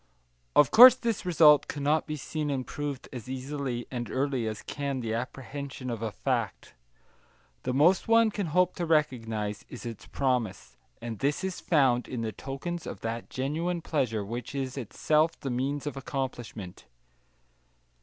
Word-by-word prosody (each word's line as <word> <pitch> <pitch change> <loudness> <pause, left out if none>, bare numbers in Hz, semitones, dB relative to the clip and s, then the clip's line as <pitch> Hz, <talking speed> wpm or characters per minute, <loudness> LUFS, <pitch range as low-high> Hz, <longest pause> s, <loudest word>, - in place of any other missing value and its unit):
Of 150 - +6
course 245 +3 +11
this 230 -7 -2
result 155 -4 +6
cannot 150 +2 0
be 150 - -3
seen 150 +1 -3
and 135 -3 -1
proved 145 -2 -5
as 125 -1 -7
easily 130 -2 -3
and 120 -2 -4
early 130 -3 -1
as 110 -1 -5
can 140 -2 -3
the 115 -2 -3
apprehension 130 +1 -5
of 115 -2 -4
a 110 -2 -2
fact. - - -2 0.9
The 125 - -2
most 170 +7 +4
one 230 -1 +5
can 200 -3 -2
hope 180 +3 +2
to 175 - -2
recognise 115 -9 0
is 125 - -9
its 115 -2 -7
promise, 115 - -1 0.3
and 115 -3 -5
this 145 +6 0
is 190 -2 -3
found 130 -7 +2
in 125 -3 -4
the 110 - -2
tokens 140 - -5
of - - -7
that 115 +1 -4
genuine 165 +6 -2
pleasure 115 -9 -1
which 120 +5 -6
is 130 -2 -3
itself 155 +6 +1
the 135 - -4
means 135 +4 -2
of 145 - -3
accomplishment. 125 -8 -5
135 Hz, 160 wpm, -28 LUFS, 120-150 Hz, 0.9 s, course